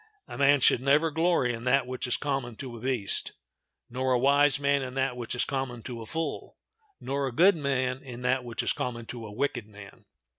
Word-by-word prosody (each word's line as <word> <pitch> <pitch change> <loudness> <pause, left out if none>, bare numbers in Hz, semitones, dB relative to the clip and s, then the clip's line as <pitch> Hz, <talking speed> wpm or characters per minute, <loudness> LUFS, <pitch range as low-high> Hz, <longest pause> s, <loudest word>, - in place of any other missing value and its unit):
A - - -8
man 140 0 +4
should 120 - +4
never 145 +4 +3
glory 160 -6 +2
in 115 0 -6
that 130 0 +3
which 130 0 -4
is 125 - +1
common 135 -5 -3
to 125 0 -7
a - - -9
beast; 125 -6 -1 0.5
nor 130 +1 -1
a - - +4
wise 140 +2 +4
man 140 0 +2
in 130 -1 -6
that 135 -1 0
which 120 0 -4
is 125 - +2
common 130 -4 -4
to 120 -2 -6
a 110 - -9
fool; 165 +4 -4 0.4
nor 140 0 -2
a - - -3
good 175 +10 +5
man 135 -3 -1
in 125 -2 -9
that 130 0 +1
which 120 -2 -3
is - - +2
common 120 -2 -4
to 115 -1 -7
a - - -10
wicked 125 -1 -2
man. 105 -2 -14
130 Hz, 220 wpm, -28 LUFS, 120-140 Hz, 0.5 s, good